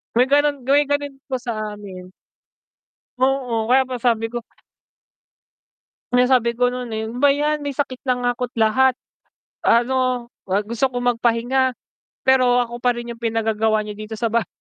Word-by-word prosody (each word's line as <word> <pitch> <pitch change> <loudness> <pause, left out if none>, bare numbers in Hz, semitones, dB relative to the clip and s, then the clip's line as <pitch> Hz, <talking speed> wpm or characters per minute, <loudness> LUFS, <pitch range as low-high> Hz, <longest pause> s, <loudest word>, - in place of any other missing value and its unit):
May 250 +2 +4
ganun, 285 -2 +2
may 285 +2 +5
ganun 285 -1 -2
po 260 -3 -3
sa 240 -2 -4 0.2
amin. 185 -3 -10 1.1
Oo, 250 -4 0
kaya 265 0 +4
pa, 255 - -4
sabi 230 -2 +1
ko 240 0 -5 1.7
Yung 250 +1 +4
sabi 235 -2 +3
ko 245 +1 +2
nun, 250 -2 -5
eh, 220 0 -3
ba 275 +4 +3
yan 295 +1 0
may 285 - -2
sakit 260 -2 -3
na 255 - +3
nga 245 0 +2
ko't 250 -1 -4
lahat, 255 +4 +4 0.7
ano 250 0 +2 0.2
wa 195 +1 0
gusto 235 +3 0
ko 245 - -2
magpahinga 245 +2 +1 0.5
pero 250 -2 +4
ako 240 +1 -8
pa 245 -1 +2
rin 240 0 -5
yung 230 - -14
pinagagawa 220 -1 +1
niyo 210 - -6
dito 215 +1 -7
sa 230 -2 0
bahay. 230 -5 +1
245 Hz, 165 wpm, -21 LUFS, 230-260 Hz, 1.7 s, may